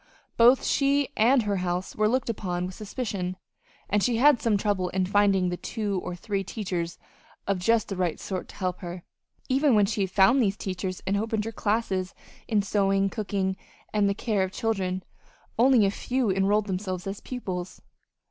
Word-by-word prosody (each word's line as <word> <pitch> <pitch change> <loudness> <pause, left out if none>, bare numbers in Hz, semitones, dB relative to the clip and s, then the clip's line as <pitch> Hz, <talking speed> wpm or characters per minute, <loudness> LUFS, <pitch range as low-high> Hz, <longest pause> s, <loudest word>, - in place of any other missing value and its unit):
Both 245 +3 +6
she 280 0 +2
and 240 +3 +4
her 205 -1 0
house 180 0 -2
were 215 0 +2
looked 255 +1 0
upon 180 -4 -3
with 185 - -6
suspicion, 200 -3 -4 0.5
and 205 +1 +1
she 235 +2 +1
had 275 0 +5
some 220 -3 +2
trouble 200 -3 0
in 185 +1 0
finding 195 -1 +3
the 175 - -3
two 205 -4 -3
or 180 - -4
three 195 +2 -3
teachers 180 -4 -4 0.5
of 195 -2 0
just 225 +4 +2
the 195 - -3
right 180 -3 -1
sort 185 -2 -4
to - - -13
help 185 -2 -2
her. 175 -1 -7 0.4
Even 270 -1 +3
when 205 -1 +5
she 200 - -2
had 190 - 0
found 200 +8 +5
these 200 -3 +1
teachers 185 -1 -4
and 200 +1 +1
opened 220 0 -1
her 225 - -3
classes 205 -4 -1 0.3
in 210 -3 +2
sewing, 195 -1 +1
cooking, 195 -3 -1 0.4
and 205 -1 +3
the 200 - 0
care 210 -2 0
of 190 0 -1
children, 190 -4 -2 0.6
only 245 -3 +6
a 195 - +2
few 245 +1 -1
enrolled 200 +2 +2
themselves 185 -2 -3
as 195 +1 -5
pupils. 185 -8 -5
200 Hz, 185 wpm, -26 LUFS, 185-220 Hz, 0.6 s, Both